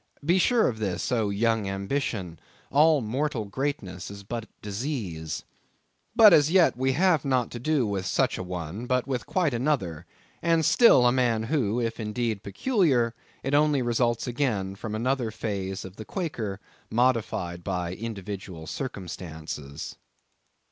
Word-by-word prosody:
Be 175 Hz, +4 st, +4 dB
sure 235 Hz, +4 st, +4 dB
of 110 Hz, -3 st, -2 dB
this, 100 Hz, +2 st, -2 dB
O 110 Hz, -4 st, +1 dB
young 110 Hz, 0 st, +1 dB
ambition, 95 Hz, -, -3 dB, 0.3 s
all 150 Hz, +1 st, +5 dB
mortal 125 Hz, +1 st, -1 dB
greatness 100 Hz, -6 st, -4 dB
is 100 Hz, 0 st, -9 dB
but 115 Hz, +2 st, -5 dB
disease. 100 Hz, -, -4 dB, 0.7 s
But, 220 Hz, -5 st, +9 dB
as 150 Hz, -1 st, +6 dB
yet 180 Hz, 0 st, +5 dB
we 130 Hz, +2 st, +1 dB
have 175 Hz, 0 st, +3 dB
not 130 Hz, -4 st, +1 dB
to 120 Hz, -, -6 dB
do 145 Hz, 0 st, +1 dB
with 100 Hz, -3 st, -2 dB
such -, -, +1 dB
an 90 Hz, -, -5 dB
one, 90 Hz, +6 st, -5 dB
but 125 Hz, 0 st, +1 dB
with 130 Hz, -3 st, -3 dB
quite 170 Hz, -7 st, +1 dB
another; 115 Hz, -, -1 dB, 0.3 s
and 165 Hz, -2 st, +2 dB
still 230 Hz, -, +6 dB
a 120 Hz, -, +6 dB
man, 120 Hz, -3 st, +2 dB
who, 120 Hz, -4 st, 0 dB
if 115 Hz, -1 st, -2 dB
indeed 110 Hz, -1 st, -2 dB
peculiar, 130 Hz, -, +1 dB, 0.3 s
it 135 Hz, -, -2 dB
only 145 Hz, -2 st, +3 dB
results 120 Hz, -1 st, +1 dB
again 120 Hz, -7 st, -1 dB
from 105 Hz, +2 st, -5 dB
another 125 Hz, +1 st, 0 dB
phase 100 Hz, -4 st, -4 dB
of 95 Hz, +1 st, -11 dB
the 110 Hz, -, -7 dB
Quaker, 115 Hz, -, -3 dB, 0.3 s
modified 110 Hz, -8 st, 0 dB
by 90 Hz, -2 st, -2 dB
individual 100 Hz, -5 st, -6 dB
circumstances. 80 Hz, -, -6 dB
115 Hz, 150 wpm, -27 LUFS, 95-135 Hz, 0.7 s, But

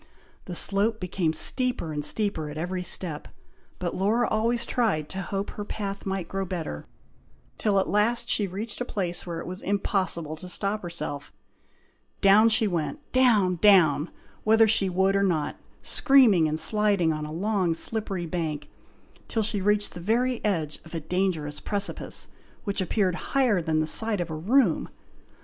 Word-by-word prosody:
The 180 Hz, -, -5 dB
slope 205 Hz, +5 st, +1 dB
became 180 Hz, -3 st, -1 dB
steeper 245 Hz, -, +1 dB
and 150 Hz, 0 st, -3 dB
steeper 160 Hz, -2 st, 0 dB
at 150 Hz, -, -8 dB
every 180 Hz, +3 st, -3 dB
step; 175 Hz, -4 st, -3 dB, 0.5 s
but 175 Hz, -2 st, -3 dB
Laura 220 Hz, +5 st, +1 dB
always 235 Hz, +2 st, 0 dB
tried 215 Hz, -, 0 dB
to 190 Hz, -, -5 dB
hope 195 Hz, +2 st, -4 dB
her 205 Hz, -, -6 dB
path 200 Hz, -1 st, -5 dB
might 190 Hz, -3 st, -3 dB
grow 195 Hz, 0 st, -3 dB
better, 170 Hz, -, -5 dB, 0.7 s
till 205 Hz, -2 st, +1 dB
at 190 Hz, -, 0 dB
last 235 Hz, +3 st, +1 dB
she 205 Hz, -4 st, +2 dB
reached 205 Hz, +6 st, -6 dB
a -, -, +2 dB
place 180 Hz, -7 st, -3 dB
where 170 Hz, -1 st, -4 dB
it -, -, -7 dB
was 185 Hz, +1 st, -6 dB
impossible 190 Hz, -5 st, -1 dB
to 180 Hz, +3 st, -6 dB
stop 200 Hz, +3 st, +1 dB
herself. 170 Hz, -5 st, -6 dB, 0.9 s
Down 205 Hz, +3 st, +6 dB
she 220 Hz, 0 st, +4 dB
went, 190 Hz, -, -4 dB
down! 215 Hz, -8 st, +3 dB
down! 170 Hz, -6 st, +4 dB, 0.3 s
whether 220 Hz, +1 st, +5 dB
she 205 Hz, -3 st, +3 dB
would 190 Hz, +2 st, +1 dB
or 195 Hz, -, +2 dB
not, 165 Hz, -7 st, 0 dB, 0.3 s
screaming 245 Hz, -, +5 dB
and 155 Hz, +1 st, -2 dB
sliding 200 Hz, -2 st, +2 dB
on 155 Hz, 0 st, -4 dB
a -, -, -8 dB
long 185 Hz, 0 st, 0 dB
slippery 195 Hz, -2 st, -4 dB
bank, 155 Hz, -3 st, -4 dB, 0.6 s
till 225 Hz, -, -1 dB
she 205 Hz, -1 st, +1 dB
reached 210 Hz, +1 st, +1 dB
the 175 Hz, -, -8 dB
very 235 Hz, +6 st, 0 dB
edge 165 Hz, -8 st, -1 dB
of 165 Hz, +1 st, -10 dB
a -, -, -1 dB
dangerous 160 Hz, -3 st, -2 dB
precipice, 200 Hz, -1 st, -1 dB, 0.4 s
which 200 Hz, -3 st, -2 dB
appeared 190 Hz, 0 st, 0 dB, 0.2 s
higher 240 Hz, -9 st, +3 dB
than 160 Hz, -1 st, 0 dB
the -, -, 0 dB
side 220 Hz, +5 st, +2 dB
of 175 Hz, -2 st, -3 dB
a -, -, -3 dB
room. 200 Hz, -, +2 dB
195 Hz, 170 wpm, -26 LUFS, 170-215 Hz, 0.9 s, Down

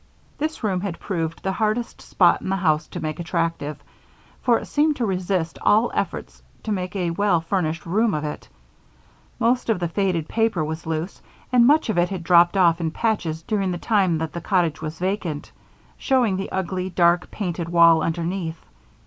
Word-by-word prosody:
This 310 Hz, -3 st, -3 dB
room 190 Hz, -4 st, 0 dB
had 190 Hz, -4 st, -4 dB
proved 165 Hz, -4 st, -3 dB
the 190 Hz, -, 0 dB
hardest 220 Hz, +4 st, -2 dB
spot 175 Hz, -3 st, +3 dB
in -, -, -5 dB
the 195 Hz, -, +1 dB
house 155 Hz, -5 st, +1 dB
to -, -, -7 dB
make 155 Hz, +2 st, -4 dB
attractive, 165 Hz, -3 st, -2 dB, 0.6 s
for 240 Hz, -2 st, +3 dB
it -, -, -6 dB
seemed 300 Hz, +1 st, +1 dB
to 240 Hz, -, -1 dB
resist 185 Hz, -3 st, -2 dB
all 220 Hz, +3 st, +3 dB
efforts -, -, -4 dB, 0.2 s
to 220 Hz, -, -3 dB
make 185 Hz, -1 st, -3 dB
a 180 Hz, -3 st, -1 dB
well 200 Hz, -1 st, +2 dB
furnished 165 Hz, -1 st, -2 dB
room 210 Hz, +4 st, +1 dB
of 150 Hz, -, -2 dB
it. 150 Hz, -, -6 dB, 0.9 s
Most 240 Hz, +2 st, +1 dB
of 215 Hz, -5 st, +2 dB
the 175 Hz, -, -1 dB
faded 170 Hz, -3 st, -1 dB
paper 225 Hz, -8 st, 0 dB
was 160 Hz, +1 st, -6 dB
loose 160 Hz, +3 st, -3 dB, 0.3 s
and 240 Hz, -1 st, +6 dB
much 305 Hz, +3 st, +4 dB
of 205 Hz, -, +1 dB
it 175 Hz, -, +2 dB
had 190 Hz, -3 st, -5 dB
dropped 175 Hz, +2 st, +5 dB
off 170 Hz, -2 st, +4 dB
in 165 Hz, -, 0 dB
patches 165 Hz, -5 st, -2 dB
during 200 Hz, -1 st, -1 dB
the 175 Hz, -, -2 dB
time 190 Hz, -4 st, +1 dB
that 160 Hz, 0 st, -4 dB
the 170 Hz, -, -5 dB
cottage 175 Hz, -6 st, 0 dB
was 155 Hz, 0 st, -5 dB
vacant, 180 Hz, -5 st, -3 dB, 0.5 s
showing 250 Hz, -7 st, +2 dB
the 195 Hz, +1 st, -4 dB
ugly, 185 Hz, 0 st, -2 dB
dark, 175 Hz, 0 st, +2 dB
painted 175 Hz, -4 st, -4 dB
wall 170 Hz, -1 st, +6 dB
underneath. 165 Hz, +1 st, -2 dB
180 Hz, 185 wpm, -23 LUFS, 165-205 Hz, 0.9 s, and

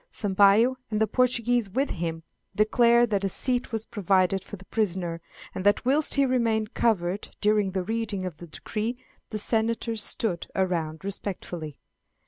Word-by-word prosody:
Sampayo, 205 Hz, +5 st, +4 dB
and 215 Hz, -1 st, -1 dB
the 220 Hz, -, +4 dB
Portuguese 245 Hz, -1 st, +1 dB
with 265 Hz, +8 st, -1 dB
him, 165 Hz, -1 st, -4 dB, 0.3 s
declare 235 Hz, +3 st, +4 dB
that 205 Hz, -4 st, -1 dB
a 195 Hz, -, +1 dB
seat 250 Hz, +5 st, -2 dB
was 225 Hz, -1 st, -2 dB
provided 190 Hz, -2 st, +1 dB
for 205 Hz, -, -8 dB
the 190 Hz, -1 st, -15 dB
prisoner; 180 Hz, -6 st, -2 dB, 0.3 s
and 185 Hz, -, -4 dB
that 205 Hz, +4 st, +3 dB
whilst 285 Hz, +4 st, +2 dB
he 280 Hz, -1 st, +4 dB
remained 230 Hz, -4 st, 0 dB
covered 195 Hz, -3 st, 0 dB
during 210 Hz, -1 st, +2 dB
the 190 Hz, -1 st, -1 dB
reading 215 Hz, -2 st, -3 dB
of 175 Hz, -4 st, -6 dB
the 175 Hz, -, -10 dB
decree 220 Hz, +8 st, -4 dB, 0.3 s
the 215 Hz, -, -3 dB
senators 225 Hz, +1 st, +1 dB
stood 195 Hz, -5 st, -1 dB
around 170 Hz, -3 st, -1 dB
respectfully. 175 Hz, -6 st, -5 dB
210 Hz, 155 wpm, -26 LUFS, 185-230 Hz, 0.3 s, Sampayo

